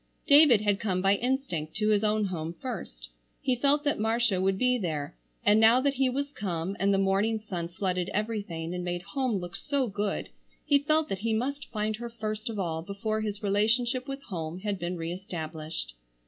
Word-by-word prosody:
David 285 Hz, -7 st, +7 dB
had 205 Hz, -2 st, +1 dB
come 190 Hz, -4 st, 0 dB
by 195 Hz, +1 st, +4 dB
instinct 235 Hz, -, -1 dB
to 215 Hz, 0 st, +1 dB
his 210 Hz, 0 st, +3 dB
own 215 Hz, 0 st, +2 dB
home 170 Hz, -3 st, -4 dB
first. -, -, -6 dB, 0.3 s
He 255 Hz, -, +1 dB
felt 285 Hz, +4 st, +2 dB
that 290 Hz, -6 st, 0 dB
Marcia 220 Hz, -3 st, +2 dB
would 190 Hz, 0 st, +2 dB
be 250 Hz, +2 st, +2 dB
there, 155 Hz, -, -3 dB, 0.3 s
and 210 Hz, +1 st, +6 dB
now 225 Hz, +3 st, +7 dB
that 280 Hz, +1 st, +2 dB
he 265 Hz, -1 st, +2 dB
was 280 Hz, +2 st, -2 dB
come 185 Hz, -, -3 dB
and 200 Hz, +1 st, +3 dB
the 195 Hz, -, +3 dB
morning 195 Hz, +3 st, +2 dB
sun 180 Hz, -6 st, -4 dB
flooded 180 Hz, 0 st, -2 dB
everything 205 Hz, -6 st, -3 dB
and 180 Hz, 0 st, -3 dB
made 175 Hz, 0 st, -3 dB
home 260 Hz, -1 st, -1 dB
look 180 Hz, 0 st, -4 dB
so 275 Hz, +5 st, 0 dB
good 205 Hz, -2 st, -2 dB, 0.4 s
he 285 Hz, -1 st, +5 dB
felt 310 Hz, +2 st, +2 dB
that 195 Hz, -, -2 dB
he 225 Hz, +2 st, 0 dB
must 280 Hz, +5 st, -2 dB
find 215 Hz, -1 st, -1 dB
her 235 Hz, +1 st, -5 dB
first 215 Hz, 0 st, -4 dB
of 220 Hz, -, -4 dB
all 165 Hz, -4 st, -1 dB
before 205 Hz, +4 st, -2 dB
his 210 Hz, -1 st, -4 dB
relationship 235 Hz, +6 st, +1 dB
with 275 Hz, 0 st, -5 dB
home 170 Hz, -2 st, -5 dB
had 205 Hz, -2 st, -2 dB
been 175 Hz, +1 st, -3 dB
re 165 Hz, 0 st, -3 dB
established. 160 Hz, -, -5 dB
210 Hz, 200 wpm, -28 LUFS, 180-240 Hz, 0.4 s, David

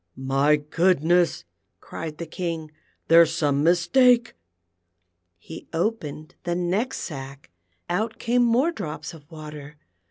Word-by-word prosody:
" 85 Hz, -, -39 dB, 0.2 s
My 150 Hz, +1 st, +5 dB
goodness! 170 Hz, +3 st, +2 dB, 0.2 s
" -, -, -51 dB
cried 155 Hz, -2 st, -7 dB
the 170 Hz, -, -5 dB
King, 165 Hz, -1 st, -5 dB, 0.2 s
" -, -, -43 dB
there's 165 Hz, 0 st, +6 dB
some 145 Hz, -3 st, +1 dB
mis 170 Hz, +1 st, +3 dB
take." 250 Hz, -3 st, +4 dB, 1.0 s
He 160 Hz, -, -11 dB
opened 165 Hz, -4 st, -3 dB
the 175 Hz, 0 st, -1 dB
next 185 Hz, +9 st, -1 dB
sack; 135 Hz, -, -8 dB, 0.4 s
out 220 Hz, +6 st, -2 dB
came 245 Hz, +2 st, +1 dB
more 245 Hz, +8 st, +3 dB
drops 170 Hz, -, -6 dB
of 150 Hz, -2 st, -15 dB
water. 150 Hz, -2 st, -10 dB
165 Hz, 135 wpm, -24 LUFS, 150-190 Hz, 1.0 s, there's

